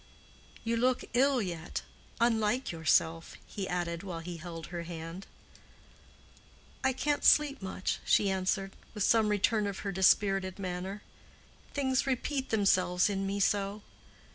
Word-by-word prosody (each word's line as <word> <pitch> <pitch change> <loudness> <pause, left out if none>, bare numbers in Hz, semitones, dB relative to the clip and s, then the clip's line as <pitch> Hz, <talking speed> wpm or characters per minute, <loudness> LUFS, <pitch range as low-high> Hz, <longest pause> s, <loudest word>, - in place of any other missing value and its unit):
"You 230 0 0
look 250 +2 +2
ill 260 -1 +3
yet—unlike 220 +7 -2
yourself," 165 0 +1
he 195 -3 -5
added, 170 -1 -2
while 175 -4 -6
he 175 +1 -6
held 165 -1 -7
her 170 - -3
hand. 170 +2 -7 1.6
"I 265 - +3
can't 290 +3 -1
sleep 295 -4 +5
much," 190 0 -3
she 205 - +3
answered, 190 +1 -1 0.2
with 210 - -1
some 220 -1 +4
return 210 +1 +2
of 200 -1 -5
her 200 - -1
dispirited 190 0 +3
manner. 190 +1 -5 0.7
"Things 265 -2 +1
repeat 265 +1 -1
themselves 190 -2 +3
in 195 0 -2
me 200 +1 -2
so. 200 +1 0
195 Hz, 130 wpm, -31 LUFS, 180-230 Hz, 1.6 s, sleep